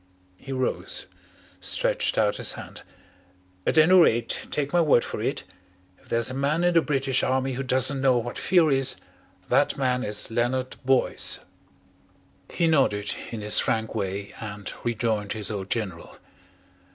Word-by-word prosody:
He 135 Hz, -, -9 dB
rose, 130 Hz, -1 st, -2 dB, 0.5 s
stretched -, -, 0 dB
out -, -, +2 dB
his -, -, +1 dB
hand. -, -, -10 dB, 0.9 s
"At -, -, +1 dB
any 160 Hz, +4 st, +6 dB
rate, 120 Hz, -11 st, +3 dB
take 145 Hz, +1 st, -2 dB
my 175 Hz, -, +4 dB
word 145 Hz, -7 st, +4 dB
for -, -, -5 dB
it -, -, -2 dB, 0.6 s
if -, -, -24 dB
there's 115 Hz, +1 st, +1 dB
a -, -, -5 dB
man 145 Hz, +5 st, 0 dB
in 175 Hz, 0 st, +3 dB
the 165 Hz, -, +5 dB
British 135 Hz, -3 st, 0 dB
Army 130 Hz, 0 st, 0 dB
who 130 Hz, -, -3 dB
doesn't 130 Hz, +1 st, +2 dB
know 130 Hz, -2 st, +4 dB
what 120 Hz, +1 st, -3 dB
fear 170 Hz, -5 st, +3 dB
is, 135 Hz, -1 st, +2 dB, 0.5 s
that -, -, +2 dB
man 125 Hz, -2 st, 0 dB
is 105 Hz, 0 st, -4 dB
Leonard 125 Hz, +3 st, -1 dB
Boyce." 130 Hz, 0 st, +1 dB, 1.1 s
He 170 Hz, -, 0 dB
nodded 130 Hz, -10 st, +2 dB, 0.2 s
in 115 Hz, -2 st, -6 dB
his 105 Hz, 0 st, +3 dB
frank 110 Hz, 0 st, -1 dB
way 100 Hz, -1 st, -4 dB
and 105 Hz, -2 st, -6 dB
rejoined 110 Hz, -3 st, -1 dB
his 110 Hz, -1 st, -3 dB
old 100 Hz, -2 st, -5 dB
General. 100 Hz, -8 st, -4 dB
125 Hz, 155 wpm, -25 LUFS, 110-135 Hz, 1.1 s, any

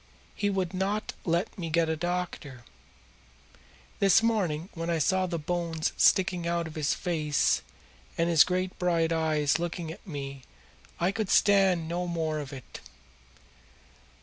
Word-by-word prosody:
He 205 Hz, -, -1 dB
would 190 Hz, -3 st, -1 dB
not 200 Hz, +3 st, -2 dB
let 175 Hz, +5 st, -1 dB
me 165 Hz, -2 st, -3 dB
get 165 Hz, +1 st, +2 dB
a 160 Hz, -, 0 dB
doctor. 170 Hz, -6 st, -4 dB, 1.4 s
This 200 Hz, +2 st, +5 dB
morning 185 Hz, -7 st, 0 dB
when 165 Hz, 0 st, -4 dB
I 170 Hz, -, +1 dB
saw 185 Hz, +4 st, +1 dB
his 170 Hz, -2 st, -3 dB
bones 165 Hz, 0 st, -2 dB
sticking 180 Hz, -3 st, +3 dB
out 170 Hz, 0 st, 0 dB
of 160 Hz, -, -8 dB
his 150 Hz, -3 st, 0 dB
face 155 Hz, -5 st, +1 dB, 0.6 s
and 165 Hz, -, +2 dB
his 165 Hz, -3 st, +7 dB
great 185 Hz, 0 st, -2 dB
bright 170 Hz, -2 st, +1 dB
eyes 155 Hz, -2 st, +1 dB
looking 170 Hz, -1 st, -4 dB
at 165 Hz, -, -12 dB
me 140 Hz, -4 st, -6 dB, 0.6 s
I 175 Hz, +2 st, +2 dB
could 210 Hz, -1 st, -3 dB
stand 195 Hz, -5 st, +4 dB
no 175 Hz, +2 st, -2 dB
more 160 Hz, -3 st, -1 dB
of 145 Hz, -1 st, -6 dB
it. 130 Hz, -4 st, -10 dB
170 Hz, 150 wpm, -28 LUFS, 160-185 Hz, 1.4 s, his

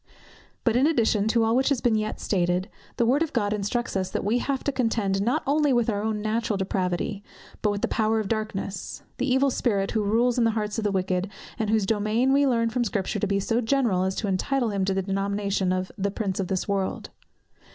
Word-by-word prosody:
_ -, -, -47 dB, 0.6 s
But 230 Hz, -2 st, +2 dB
in 260 Hz, +4 st, +4 dB
addition 225 Hz, -8 st, +2 dB
to 230 Hz, +1 st, +3 dB
all 225 Hz, +1 st, +2 dB
which 265 Hz, +3 st, +3 dB
has 280 Hz, -4 st, +1 dB
been 240 Hz, -1 st, +2 dB
yet 215 Hz, 0 st, -1 dB
stated, 180 Hz, 0 st, 0 dB, 0.3 s
the 235 Hz, -, +3 dB
word 265 Hz, +6 st, +3 dB
of 325 Hz, -2 st, -1 dB
God 210 Hz, -4 st, +1 dB
instructs 210 Hz, +4 st, -2 dB
us 190 Hz, -1 st, 0 dB
that -, -, -3 dB
we 225 Hz, +4 st, +2 dB
have 270 Hz, +1 st, -2 dB
to 280 Hz, -, 0 dB
contend 225 Hz, -6 st, 0 dB
not 245 Hz, +9 st, +1 dB
only 295 Hz, +1 st, +2 dB
with 240 Hz, -1 st, +2 dB
our 205 Hz, -1 st, -2 dB
own 215 Hz, -1 st, -2 dB
natural 220 Hz, -1 st, 0 dB
depravity, 190 Hz, +1 st, -2 dB, 0.4 s
but 210 Hz, -, +2 dB
with 205 Hz, 0 st, -2 dB
the -, -, +3 dB
power 220 Hz, 0 st, +1 dB
of 215 Hz, -, -2 dB
darkness, 210 Hz, -3 st, -4 dB, 0.2 s
the 260 Hz, -, 0 dB
Evil 265 Hz, +1 st, +3 dB
Spirit, 200 Hz, -6 st, 0 dB
who 220 Hz, -, 0 dB
rules 235 Hz, +4 st, +2 dB
in -, -, +4 dB
the 225 Hz, -1 st, +1 dB
hearts 210 Hz, +1 st, -2 dB
of -, -, -3 dB
the 205 Hz, -, +1 dB
wicked, 185 Hz, 0 st, -1 dB, 0.3 s
and 220 Hz, -2 st, 0 dB
whose 215 Hz, -2 st, +2 dB
dominion 220 Hz, +5 st, +1 dB
we 280 Hz, 0 st, +4 dB
learn 230 Hz, -3 st, +1 dB
from 245 Hz, +1 st, 0 dB
Scripture 200 Hz, -4 st, -2 dB
to 210 Hz, -, 0 dB
be 200 Hz, 0 st, +1 dB
so 225 Hz, +4 st, 0 dB
general, 230 Hz, -6 st, +1 dB
as 190 Hz, 0 st, 0 dB
to 215 Hz, -, -2 dB
entitle 235 Hz, +6 st, 0 dB
him 195 Hz, -2 st, 0 dB
to 195 Hz, -, +1 dB
the 195 Hz, -, 0 dB
denomination 195 Hz, 0 st, -1 dB
of 185 Hz, 0 st, -2 dB
"the 200 Hz, +1 st, +1 dB
Prince 200 Hz, -1 st, -3 dB
of 190 Hz, -, -1 dB
this 185 Hz, 0 st, -2 dB
world." 195 Hz, -2 st, -2 dB
215 Hz, 235 wpm, -25 LUFS, 195-240 Hz, 0.6 s, in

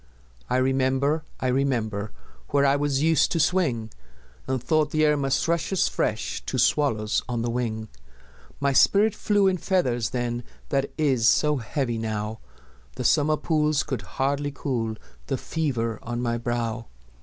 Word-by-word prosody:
I -, -, +2 dB
remember, 135 Hz, +3 st, +1 dB, 0.2 s
I -, -, -4 dB
remember 115 Hz, -6 st, -1 dB, 0.4 s
Where 140 Hz, 0 st, +3 dB
I 140 Hz, 0 st, +4 dB
was 145 Hz, -1 st, 0 dB
used 160 Hz, -2 st, +3 dB
to 165 Hz, -, 0 dB
swing, 145 Hz, -10 st, +1 dB, 0.6 s
And 130 Hz, -1 st, 0 dB
thought 150 Hz, +4 st, +1 dB
the 155 Hz, +1 st, +2 dB
air 150 Hz, 0 st, +4 dB
must 135 Hz, -1 st, 0 dB
rush 170 Hz, +2 st, 0 dB
as 190 Hz, -, +2 dB
fresh 110 Hz, +1 st, -2 dB
To 130 Hz, -, -2 dB
swallows 120 Hz, -4 st, +2 dB
on 120 Hz, -2 st, -1 dB
the 120 Hz, -, -1 dB
wing; 110 Hz, -2 st, -2 dB, 0.7 s
My 140 Hz, 0 st, +1 dB
spirit 205 Hz, +10 st, +5 dB
flew 205 Hz, -1 st, +2 dB
in 190 Hz, -1 st, +3 dB
feathers 130 Hz, -, 0 dB
then 120 Hz, -1 st, -2 dB, 0.3 s
That 140 Hz, 0 st, 0 dB
is 135 Hz, -7 st, +2 dB
so 150 Hz, +6 st, +3 dB
heavy 120 Hz, 0 st, -2 dB
now, 110 Hz, 0 st, -3 dB, 0.6 s
The -, -, -4 dB
summer 155 Hz, +1 st, +3 dB
pools 155 Hz, -2 st, +1 dB
could 130 Hz, -7 st, -4 dB, 0.2 s
hardly 140 Hz, +2 st, 0 dB
cool 120 Hz, -6 st, -2 dB, 0.3 s
The 135 Hz, -, -1 dB
fever 120 Hz, -10 st, -2 dB
on 120 Hz, +1 st, -4 dB
my 120 Hz, -1 st, -1 dB
brow. 120 Hz, -1 st, -2 dB
135 Hz, 155 wpm, -25 LUFS, 115-150 Hz, 0.7 s, spirit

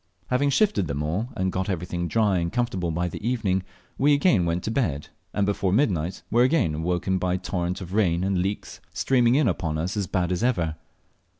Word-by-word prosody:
Having 130 Hz, +3 st, +2 dB
shifted 140 Hz, -, +2 dB
there 70 Hz, -1 st, -3 dB
all, 85 Hz, -, -2 dB
and 95 Hz, 0 st, 0 dB
got 95 Hz, +2 st, -2 dB
everything 90 Hz, -1 st, -2 dB
dry 105 Hz, -2 st, +2 dB
and 85 Hz, 0 st, -2 dB
comfortable 115 Hz, -8 st, -1 dB
by 85 Hz, +2 st, -1 dB
the 90 Hz, -, -7 dB
evening, 110 Hz, -6 st, 0 dB, 0.4 s
we 145 Hz, +2 st, +5 dB
again 130 Hz, -, +3 dB
went 85 Hz, +1 st, -1 dB
to 110 Hz, -, -2 dB
bed, 85 Hz, -, -1 dB, 0.2 s
and 100 Hz, -, 0 dB
before 100 Hz, -2 st, 0 dB
midnight 95 Hz, -, 0 dB
were 120 Hz, -, +4 dB
again 130 Hz, -, +3 dB
awaked 90 Hz, +4 st, -1 dB
by 90 Hz, 0 st, 0 dB
torrent 90 Hz, -1 st, -3 dB
of 90 Hz, 0 st, -7 dB
rain 90 Hz, -5 st, +2 dB
and 95 Hz, -1 st, +1 dB
leaks 100 Hz, +3 st, -3 dB
streaming 125 Hz, -2 st, +3 dB
in 145 Hz, -2 st, +3 dB
upon 80 Hz, -7 st, -1 dB
us 85 Hz, +6 st, -2 dB
as 100 Hz, -3 st, -1 dB
bad 90 Hz, -2 st, 0 dB
as 90 Hz, -, -1 dB
ever. 85 Hz, -11 st, +1 dB
95 Hz, 200 wpm, -25 LUFS, 85-115 Hz, 0.4 s, we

